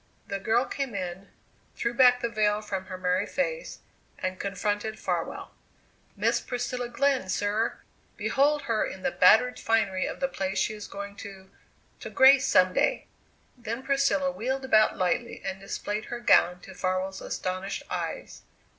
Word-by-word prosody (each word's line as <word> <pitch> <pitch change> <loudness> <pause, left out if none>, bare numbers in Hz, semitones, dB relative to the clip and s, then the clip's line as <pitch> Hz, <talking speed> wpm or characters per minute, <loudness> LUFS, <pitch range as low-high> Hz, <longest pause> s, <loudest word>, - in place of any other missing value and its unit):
The 200 0 -2
girl 225 +6 +2
came 270 -6 -4
in, 185 +1 -5 0.5
threw 235 - -2
back 250 0 +5
the 235 - 0
veil 215 -2 +1
from 195 -3 -4
her 185 - -6
merry 180 0 0
face, - - -3 0.4
and 185 0 -4
confronted 205 +2 -2
Farwell. - - -3 0.6
"Miss - - +1
Priscilla 245 0 -3
Glenn, 265 -5 +1
sir! 205 +4 0 0.4
Behold 290 +2 +2
her 225 -4 0
in 190 - -6
the - - +1
battered 225 +7 +5
finery 205 -5 +1
of - - -6
the 270 - +1
place 195 -6 -3
she - - +1
is 210 -1 -8
going 200 0 -8
to 195 -2 -10 0.5
to - - -7
grace 270 0 +6
some 185 0 +4
day!" - - +1 0.5
Then 235 0 -5
Priscilla 275 0 +1
wheeled 265 +1 -3
about 215 -4 +4
lightly 185 +6 -1
and 190 - -4
displayed 205 +2 -4
her 240 - -5
gown 180 -6 +4
to 190 - -11
Farwell's 185 +1 -2
astonished 185 +2 -4
eyes. - - -5
215 Hz, 155 wpm, -27 LUFS, 190-250 Hz, 0.6 s, grace